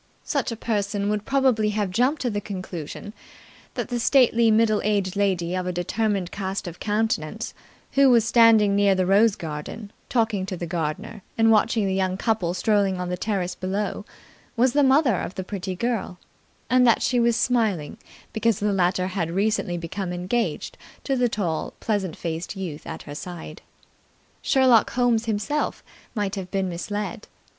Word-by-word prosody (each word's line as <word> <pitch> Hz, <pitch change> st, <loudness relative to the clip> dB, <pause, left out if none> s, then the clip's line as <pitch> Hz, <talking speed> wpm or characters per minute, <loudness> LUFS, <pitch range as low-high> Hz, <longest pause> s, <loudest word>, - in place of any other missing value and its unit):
Such 280 Hz, -5 st, -1 dB
a -, -, -3 dB
person 205 Hz, -2 st, -1 dB
would 210 Hz, 0 st, -1 dB
probably 260 Hz, -6 st, +2 dB
have 205 Hz, -3 st, 0 dB
jumped 255 Hz, +9 st, +1 dB
to 245 Hz, -, 0 dB
the 205 Hz, 0 st, -2 dB
conclusion 190 Hz, -1 st, -7 dB, 0.6 s
that -, -, -3 dB
the 240 Hz, -1 st, +4 dB
middle 215 Hz, -1 st, +3 dB
aged 200 Hz, -2 st, 0 dB
lady 185 Hz, -4 st, 0 dB
of 185 Hz, -1 st, -2 dB
a -, -, 0 dB
determined 190 Hz, +1 st, -1 dB
cast 195 Hz, -1 st, -4 dB
of 175 Hz, 0 st, -8 dB
countenance 215 Hz, -1 st, -1 dB, 0.4 s
who 275 Hz, -1 st, +5 dB
was 235 Hz, -3 st, +5 dB
standing 220 Hz, -3 st, +5 dB
near 200 Hz, -1 st, +4 dB
the 185 Hz, -1 st, +1 dB
rose 205 Hz, +3 st, +4 dB
garden, 165 Hz, +7 st, -7 dB, 0.2 s
talking 220 Hz, -6 st, 0 dB
to 185 Hz, -, -4 dB
the 175 Hz, -, -4 dB
gardener 170 Hz, +5 st, -4 dB, 0.2 s
and 225 Hz, 0 st, +5 dB
watching 220 Hz, 0 st, +3 dB
the 190 Hz, -, 0 dB
young 190 Hz, -1 st, 0 dB
couple 190 Hz, -5 st, 0 dB
strolling 195 Hz, -1 st, +1 dB
on 180 Hz, 0 st, -3 dB
the 180 Hz, -, -1 dB
terrace 185 Hz, -3 st, -2 dB
below, 195 Hz, +4 st, -3 dB, 0.5 s
was 250 Hz, +2 st, +3 dB
the 290 Hz, -, +4 dB
mother 265 Hz, -, +4 dB
of 180 Hz, -, -5 dB
the 190 Hz, -, -3 dB
pretty 190 Hz, -1 st, -5 dB
girl, 220 Hz, -3 st, -2 dB, 0.5 s
and 250 Hz, 0 st, +4 dB
that 230 Hz, -, +4 dB
she 250 Hz, -, +2 dB
was 235 Hz, -1 st, +3 dB
smiling 220 Hz, -10 st, 0 dB, 0.3 s
because 220 Hz, -2 st, +1 dB
the 205 Hz, 0 st, 0 dB
latter 185 Hz, -1 st, +1 dB
had 185 Hz, -3 st, -2 dB
recently 195 Hz, -1 st, 0 dB
become 175 Hz, +2 st, -4 dB
engaged 185 Hz, +7 st, -2 dB, 0.2 s
to 270 Hz, -, 0 dB
the 245 Hz, -1 st, +2 dB
tall, 175 Hz, -8 st, -2 dB
pleasant 195 Hz, -7 st, -1 dB
faced 165 Hz, +3 st, -4 dB
youth 170 Hz, -6 st, -6 dB
at -, -, -6 dB
her 145 Hz, -, -8 dB
side. 160 Hz, 0 st, -8 dB, 0.8 s
Sherlock 260 Hz, -5 st, +4 dB
Holmes 240 Hz, -2 st, +2 dB
himself 225 Hz, +7 st, -2 dB, 0.3 s
might 205 Hz, -2 st, -1 dB
have 190 Hz, -3 st, -5 dB
been 190 Hz, -1 st, -1 dB
misled. 205 Hz, +3 st, -4 dB
205 Hz, 165 wpm, -24 LUFS, 185-230 Hz, 0.8 s, who